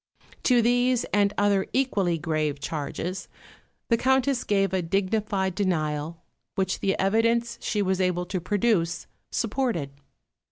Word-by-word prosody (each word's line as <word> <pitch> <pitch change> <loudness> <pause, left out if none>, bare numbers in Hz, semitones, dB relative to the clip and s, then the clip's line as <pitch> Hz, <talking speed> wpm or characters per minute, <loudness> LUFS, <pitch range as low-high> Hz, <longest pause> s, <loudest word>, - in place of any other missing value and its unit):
To 245 -3 +4
these 245 +1 +2
and 200 -1 +3
other 200 -1 +2
equally 200 -10 +1
grave 155 -3 -1
charges 160 +6 -4 0.6
the 230 - +4
Countess 265 0 +2
gave 195 -2 +1
a 190 - +1
dignified 195 +1 0
denial, 160 -4 -2 0.3
which 190 -2 -1
the 195 - 0
evidence 230 +4 +1
she 210 -1 0
was 190 0 0
able 180 -1 0
to 185 0 -3
produce 185 -2 0 0.3
supported. 225 - -1
195 Hz, 125 wpm, -26 LUFS, 175-230 Hz, 0.6 s, To